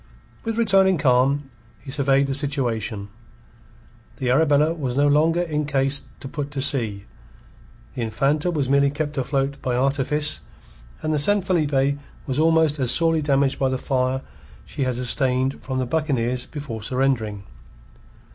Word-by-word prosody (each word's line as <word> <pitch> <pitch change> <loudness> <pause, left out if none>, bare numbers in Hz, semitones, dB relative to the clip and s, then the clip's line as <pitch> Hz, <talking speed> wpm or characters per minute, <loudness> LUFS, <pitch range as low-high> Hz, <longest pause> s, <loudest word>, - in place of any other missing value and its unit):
With 225 0 -3
returning 195 -5 +4
calm, 135 +1 +2 0.3
he 135 - -9
surveyed 140 0 +2
the 135 - -2
situation. 120 -8 -2 1.1
The 125 -2 -1
Arabella 150 +2 +3
was 135 -6 -3
no 145 +1 +4
longer 160 +4 +3
in 150 -3 -2
case 140 -1 0 0.2
to - - -6
put 145 0 -5
to 145 -1 -5
sea; 115 -8 +1 0.9
the - - -5
Infanta 135 +9 0
was 150 -6 -1
merely 140 +1 +3
kept 145 +1 -4
afloat 135 +1 -2
by 125 -1 -1
artifice, 140 +3 +1 0.6
and 155 0 0
the 150 - +1
San 205 +6 +3
Felipe 145 -6 +1 0.3
was 135 -1 -2
almost 160 -2 +3
as 130 -3 0
sorely 165 +3 +4
damaged 140 -2 +1
by 135 - +2
the 130 - -1
fire 130 0 -1 0.4
she 135 - -3
had 130 -1 -1
sustained 130 +1 0
from 130 -1 -3
the 130 - 0
buccaneers 125 -4 -1
before 140 -7 -7
surrendering. 115 -4 -1
140 Hz, 150 wpm, -22 LUFS, 130-150 Hz, 1.1 s, returning